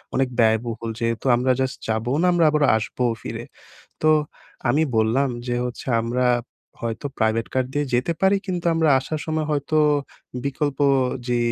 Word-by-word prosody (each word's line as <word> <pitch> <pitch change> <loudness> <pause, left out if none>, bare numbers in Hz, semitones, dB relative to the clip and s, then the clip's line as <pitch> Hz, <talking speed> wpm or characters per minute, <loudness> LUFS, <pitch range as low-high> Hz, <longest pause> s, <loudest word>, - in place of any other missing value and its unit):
অনেক 135 0 +2
ব্যয়বহুল 115 0 +1
যেহেতু 115 0 -2
আমরা 125 +2 +2
জাস্ট 130 0 -1
যাবো 110 +2 -1
না, - - +3
আমরা 170 -2 +3
আবার 150 0 +1
আসবোও 120 +2 -1
ফিরে। - - -6 0.6
তো 155 - +5 0.6
আমি 145 +6 +3
বললাম 115 +5 +2 0.2
যে 120 - -1
হচ্ছে 125 -1 -6 0.2
আমরা, 125 +2 0 0.6
হয়তো 115 +4 -3
প্রাইভেট 110 0 +1
কার 130 0 +2
দিয়ে 145 +1 0
যেতে 125 +7 +1
পারি 190 +1 +4
কিন্তু 180 -3 -3
আমরা 160 -1 +2
আসার 150 +4 -4
সময় 155 -1 -1
হয়তো 145 +1 -1 0.7
বিকল্প 140 0 -2 0.5
যে 120 0 +1
130 Hz, 155 wpm, -23 LUFS, 115-150 Hz, 0.7 s, তো